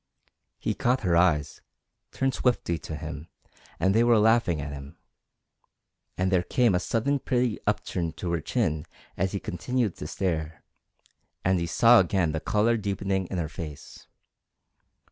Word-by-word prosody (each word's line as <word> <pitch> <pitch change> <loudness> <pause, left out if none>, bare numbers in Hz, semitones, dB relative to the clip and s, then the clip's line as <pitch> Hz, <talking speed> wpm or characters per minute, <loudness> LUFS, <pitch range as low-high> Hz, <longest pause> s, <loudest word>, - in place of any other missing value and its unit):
He - - -1
caught 125 +2 +1
her 90 -4 +1
eyes, 80 -4 +2 0.5
turned 135 0 0
swiftly 115 -12 0
to 80 - -6
him, 75 +1 -7 0.5
and 95 - +3
they 115 +2 +4
were 120 -1 +5
laughing 110 -6 +3
at 70 0 -5
him, 70 0 -9 1.2
and 95 +1 0
there 90 -2 +3
came 115 +4 +2
a 90 - +2
sudden 130 +9 0
pretty 125 -4 0
upturn 100 -5 -1
to 85 +1 -4
her 85 -2 -1
chin 75 0 -1 0.3
as 95 +2 -1
he 100 - -1
continued 110 +4 -2
to 75 - -6
stare, 80 -3 -3 0.8
and 95 0 +3
he 85 - -2
saw 115 +7 +6
again 90 -3 +1
the 80 - -2
colour 110 +6 +2
deepening 100 -2 -2
in 95 - -4
her 85 -3 -1
face. 75 -2 -9
95 Hz, 155 wpm, -27 LUFS, 80-110 Hz, 1.2 s, saw